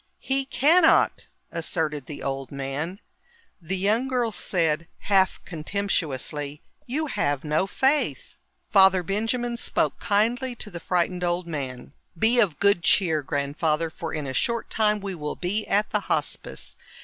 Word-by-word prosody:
"He 270 Hz, 0 st, -1 dB
cannot!" 315 Hz, +7 st, +4 dB, 0.2 s
asserted 155 Hz, -4 st, -2 dB
the 150 Hz, -, -7 dB
old 135 Hz, -1 st, -3 dB
man. 140 Hz, +7 st, -4 dB, 0.6 s
The 180 Hz, +4 st, -3 dB
young 215 Hz, +7 st, +1 dB
girl 245 Hz, -3 st, 0 dB
said, 165 Hz, -3 st, 0 dB
half 195 Hz, -2 st, +2 dB
contemptuously, 150 Hz, -5 st, -3 dB, 0.2 s
"You 295 Hz, +6 st, -1 dB
have 145 Hz, -, -1 dB
no 155 Hz, +5 st, +1 dB
faith." 270 Hz, +8 st, +1 dB, 0.4 s
Father 190 Hz, -3 st, +6 dB
Benjamin 225 Hz, +6 st, -1 dB
spoke -, -, 0 dB
kindly 235 Hz, +4 st, +1 dB
to 210 Hz, -, -8 dB
the 170 Hz, -, -6 dB
frightened 180 Hz, +1 st, 0 dB
old 175 Hz, 0 st, 0 dB
man. 135 Hz, -5 st, -6 dB, 0.2 s
"Be 230 Hz, +7 st, +3 dB
of 195 Hz, -10 st, +2 dB
good 200 Hz, -3 st, +3 dB
cheer, 165 Hz, -4 st, +3 dB
Grandfather, 150 Hz, +3 st, -1 dB
for 165 Hz, -1 st, -6 dB
in 150 Hz, -2 st, -3 dB
a 130 Hz, -, -4 dB
short 235 Hz, -, -1 dB
time 210 Hz, -1 st, +2 dB
we 195 Hz, -1 st, -4 dB
will 150 Hz, -4 st, -4 dB
be 205 Hz, +4 st, -2 dB
at 210 Hz, +1 st, +1 dB
the -, -, +2 dB
Hospice. -, -, -3 dB
180 Hz, 145 wpm, -25 LUFS, 150-220 Hz, 0.6 s, Father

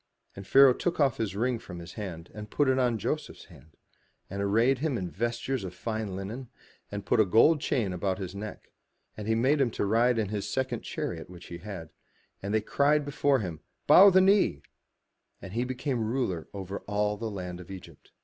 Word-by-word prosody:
And 100 Hz, 0 st, -9 dB
Pharaoh 135 Hz, -1 st, +7 dB
took 175 Hz, +6 st, -2 dB
off 135 Hz, -5 st, +3 dB
his 105 Hz, -4 st, -2 dB
ring 120 Hz, +2 st, 0 dB
from 90 Hz, -5 st, -9 dB
his 85 Hz, 0 st, -9 dB
hand, 90 Hz, -6 st, -7 dB
and 105 Hz, 0 st, -8 dB
put 145 Hz, +4 st, +1 dB
it 130 Hz, 0 st, +3 dB
on 120 Hz, -3 st, +2 dB
Joseph's 150 Hz, +9 st, -4 dB
hand, 80 Hz, -4 st, -18 dB, 0.5 s
and 100 Hz, +1 st, -3 dB
arrayed 115 Hz, +6 st, +3 dB
him 145 Hz, -3 st, 0 dB
in 90 Hz, -4 st, -4 dB
vestures 120 Hz, +3 st, -2 dB
of 90 Hz, -1 st, -7 dB
fine 110 Hz, -1 st, -3 dB
linen, 110 Hz, +7 st, -6 dB, 0.4 s
and 100 Hz, -1 st, -5 dB
put 110 Hz, -, +2 dB
a -, -, +7 dB
gold 115 Hz, -, +4 dB
chain 120 Hz, -12 st, 0 dB
about 95 Hz, +1 st, -1 dB
his 95 Hz, -2 st, -6 dB
neck; 105 Hz, +2 st, -8 dB, 0.4 s
and 105 Hz, 0 st, -7 dB
he 110 Hz, -, +2 dB
made 135 Hz, +6 st, +3 dB
him 130 Hz, -, +3 dB
to 105 Hz, -, -2 dB
ride 115 Hz, +4 st, +3 dB
in 110 Hz, -3 st, 0 dB
his 105 Hz, -1 st, -3 dB
second 130 Hz, 0 st, -2 dB
chariot 85 Hz, -1 st, -5 dB
which 90 Hz, -1 st, -12 dB
he 85 Hz, -, -7 dB
had; 90 Hz, -5 st, -8 dB, 0.5 s
and 100 Hz, -, -4 dB
they 110 Hz, 0 st, +2 dB
cried 145 Hz, +6 st, +2 dB
before 140 Hz, -2 st, +1 dB
him, 85 Hz, -6 st, -5 dB, 0.3 s
"Bow 200 Hz, +2 st, +9 dB
the 190 Hz, 0 st, +5 dB
knee," 190 Hz, -, +3 dB, 0.8 s
and 95 Hz, -, -9 dB
he 120 Hz, +2 st, 0 dB
made 125 Hz, 0 st, -6 dB
him 130 Hz, -6 st, 0 dB
ruler 110 Hz, -8 st, -2 dB
over 100 Hz, 0 st, -6 dB
all 105 Hz, 0 st, 0 dB
the 110 Hz, +2 st, -4 dB
land 90 Hz, -3 st, -6 dB
of 90 Hz, -, -11 dB
Egypt. 95 Hz, -2 st, -11 dB
110 Hz, 205 wpm, -28 LUFS, 95-130 Hz, 0.8 s, Bow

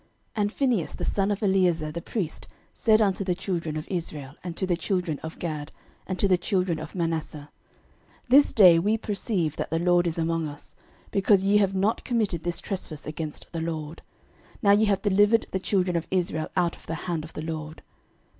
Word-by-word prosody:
06:022:031 -, -, -37 dB, 0.3 s
And 205 Hz, 0 st, +1 dB
Phinehas 245 Hz, -, 0 dB
the -, -, -4 dB
son 195 Hz, 0 st, +1 dB
of 205 Hz, +1 st, -2 dB
Eleazar 180 Hz, -6 st, +2 dB
the 170 Hz, -, -5 dB
priest 175 Hz, -4 st, -4 dB, 0.3 s
said 220 Hz, -1 st, +4 dB
unto 195 Hz, -1 st, 0 dB
the 180 Hz, -2 st, 0 dB
children 170 Hz, -5 st, -3 dB
of 155 Hz, -, -5 dB
Reuben, 155 Hz, -6 st, -4 dB
and 175 Hz, -2 st, -6 dB
to 190 Hz, -, 0 dB
the 180 Hz, -2 st, +1 dB
children 175 Hz, -3 st, -2 dB
of 160 Hz, +1 st, -8 dB
Gad, 155 Hz, -3 st, -4 dB, 0.4 s
and 185 Hz, -, -3 dB
to 200 Hz, -, +2 dB
the 185 Hz, -2 st, +3 dB
children 180 Hz, -3 st, 0 dB
of 155 Hz, +3 st, -8 dB
Manasseh, 160 Hz, -4 st, -3 dB, 0.8 s
This 280 Hz, +4 st, +6 dB
day 180 Hz, -6 st, +7 dB
we 210 Hz, +6 st, +2 dB
perceive 200 Hz, -, -2 dB
that -, -, -3 dB
the 165 Hz, -, 0 dB
LORD 175 Hz, +1 st, +3 dB
is 165 Hz, -, -2 dB
among 165 Hz, -1 st, 0 dB
us, 145 Hz, 0 st, -11 dB, 0.4 s
because 195 Hz, -1 st, +3 dB
ye 200 Hz, +1 st, +4 dB
have 195 Hz, -2 st, +2 dB
not 200 Hz, +4 st, +1 dB
committed 215 Hz, -9 st, 0 dB
this 175 Hz, -1 st, -2 dB
trespass 165 Hz, -6 st, -4 dB
against 155 Hz, 0 st, -5 dB
the 165 Hz, -, -3 dB
LORD: 160 Hz, -1 st, -4 dB, 0.6 s
now 200 Hz, -, +6 dB
ye 210 Hz, +2 st, +5 dB
have 200 Hz, -1 st, +1 dB
delivered 205 Hz, +2 st, +4 dB
the 190 Hz, -, -1 dB
children 185 Hz, -2 st, 0 dB
of 165 Hz, -, -1 dB
Israel 170 Hz, -4 st, 0 dB
out 175 Hz, -2 st, +2 dB
of -, -, -20 dB
the 165 Hz, -, -2 dB
hand 170 Hz, -4 st, -2 dB
of 160 Hz, -, -11 dB
the 155 Hz, -, -5 dB
LORD. 155 Hz, -1 st, -6 dB
175 Hz, 200 wpm, -26 LUFS, 160-200 Hz, 0.8 s, day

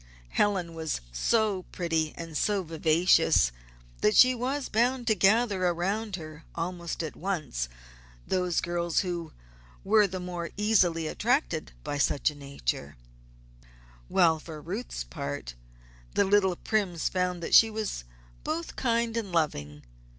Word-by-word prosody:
Helen 185 Hz, -, +1 dB
was 160 Hz, -2 st, -3 dB
so 205 Hz, -, +1 dB
pretty 165 Hz, -3 st, -1 dB
and 165 Hz, -2 st, -7 dB
so 205 Hz, +3 st, +1 dB
vivacious, 160 Hz, -, +3 dB, 0.5 s
that 210 Hz, -, +3 dB
she 255 Hz, 0 st, +8 dB
was 260 Hz, +3 st, -2 dB
bound 245 Hz, +3 st, +1 dB
to 225 Hz, -, +4 dB
gather 200 Hz, 0 st, +3 dB
around 195 Hz, +5 st, -1 dB
her 155 Hz, -2 st, -9 dB
almost 170 Hz, 0 st, -3 dB
at 155 Hz, -, -5 dB
once 155 Hz, -, -3 dB, 0.6 s
those 180 Hz, -2 st, 0 dB
girls 175 Hz, -1 st, 0 dB
who 175 Hz, -4 st, -4 dB, 0.5 s
were 210 Hz, +1 st, +5 dB
the 185 Hz, 0 st, -5 dB
more 175 Hz, -1 st, -5 dB
easily 185 Hz, -6 st, +3 dB
attracted -, -, 0 dB
by 145 Hz, -, -3 dB
such 145 Hz, +2 st, +2 dB
a -, -, -13 dB
nature; 75 Hz, -, -4 dB, 1.1 s
while 165 Hz, -4 st, +4 dB
for 155 Hz, 0 st, -9 dB
Ruth's 190 Hz, +11 st, -5 dB
part, 140 Hz, -, -5 dB, 0.6 s
the 200 Hz, -, +4 dB
little 190 Hz, -2 st, +3 dB
Primes 185 Hz, -5 st, -1 dB
found 180 Hz, -2 st, -1 dB
that -, -, -4 dB
she 225 Hz, -, +8 dB
was 215 Hz, -, -4 dB, 0.4 s
both 330 Hz, +2 st, -3 dB
kind 235 Hz, -2 st, 0 dB
and 220 Hz, -5 st, -3 dB
loving. 75 Hz, -, -1 dB
180 Hz, 135 wpm, -28 LUFS, 160-210 Hz, 1.1 s, she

